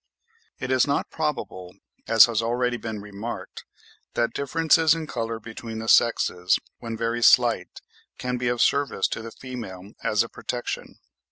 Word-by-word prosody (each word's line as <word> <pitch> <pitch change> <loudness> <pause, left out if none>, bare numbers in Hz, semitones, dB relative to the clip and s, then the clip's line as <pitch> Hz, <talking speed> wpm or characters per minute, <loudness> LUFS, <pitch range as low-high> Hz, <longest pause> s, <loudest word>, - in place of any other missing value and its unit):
It 130 - -4
is 130 +1 +4
not 140 - -1
probable, 130 - -4 0.3
as 115 -1 +8
has 115 -2 0
already 120 +1 0
been 110 -3 -6
remarked, 105 +3 -7 0.5
that 115 - +1
differences 160 +2 +3
in 165 -1 -4
colour 115 -5 -3
between 110 0 -8
the 110 0 -5
sexes, 90 -7 +3 0.2
when 115 -2 -5
very 115 +1 -1
slight, 115 -6 +4 0.4
can 125 0 -2
be 125 - -1
of 120 -1 +2
service 140 -8 +1
to - - -4
the 115 - -7
female 110 -8 -8
as 105 -1 +2
a - - -7
protection. - - -5
115 Hz, 155 wpm, -25 LUFS, 110-125 Hz, 0.5 s, as